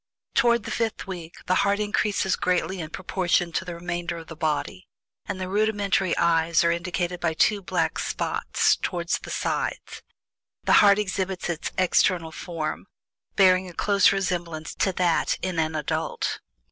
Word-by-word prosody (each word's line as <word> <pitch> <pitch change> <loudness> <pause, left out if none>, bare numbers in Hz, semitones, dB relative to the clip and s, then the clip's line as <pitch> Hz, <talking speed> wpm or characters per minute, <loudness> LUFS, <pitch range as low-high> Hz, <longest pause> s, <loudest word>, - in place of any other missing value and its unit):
Toward 235 -1 +3
the - - -6
fifth 225 -2 -2
week 175 -4 -7
the - - +1
heart 200 +1 +1
increases 205 -2 +1
greatly 180 +1 0
in 155 -2 -5
proportion 175 0 0
to 180 - -1
the 175 -2 -6
remainder 175 0 -4
of 165 - -9
the 165 - -8
body, 160 +4 -2 0.4
and 195 -2 -4
the 185 - -3
rudimentary 200 -2 +1
eyes 165 -1 +3
are 170 - +3
indicated 175 +1 -2
by 165 -2 -1
two 205 +4 +3
black 180 - -1
spots - - +1
toward 175 -2 -3
the - - -9
sides, - - -2
and - - -16 0.6
the - - +3
heart 200 -1 +6
exhibits 190 -3 -2
its 165 - -4
external 180 -2 +2
form, 165 +2 -5 0.5
bearing 185 -1 +4
a - - -11
close 200 +3 +4
resemblance 175 -5 -2
to 190 - +1
that 175 -2 +1
in 185 -3 -1
an 160 0 0
adult. 150 -2 -2
180 Hz, 160 wpm, -25 LUFS, 170-195 Hz, 0.6 s, heart